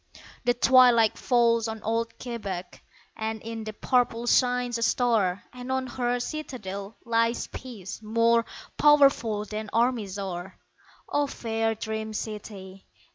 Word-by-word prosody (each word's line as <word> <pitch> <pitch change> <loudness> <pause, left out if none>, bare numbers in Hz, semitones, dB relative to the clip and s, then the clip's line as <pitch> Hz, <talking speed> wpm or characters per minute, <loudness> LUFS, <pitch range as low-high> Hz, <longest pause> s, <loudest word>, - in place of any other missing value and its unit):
The 245 0 +3
twilight 245 -3 +5
falls 235 -2 +2
on 220 -1 -6
old 230 +1 -1
Quebec 200 -7 -6 0.3
And 220 0 -3
in 225 -1 -6
the 215 - -4
purple 240 0 +1
shines 245 -1 +2
a - - -6
star, 225 -6 +2
And 250 +1 -7
on 260 0 0
her 245 0 -1
citadel 225 -8 -6
lies 230 0 +1
peace 220 -7 -8
More 230 +2 +3 0.4
powerful 275 -8 +4
than 215 0 -5
armies 230 -4 0
are. 185 -1 -5 0.5
O 290 0 +1
fair 225 -3 -1
dream 220 0 -4
city! 200 -3 -7
230 Hz, 130 wpm, -27 LUFS, 215-245 Hz, 0.5 s, twilight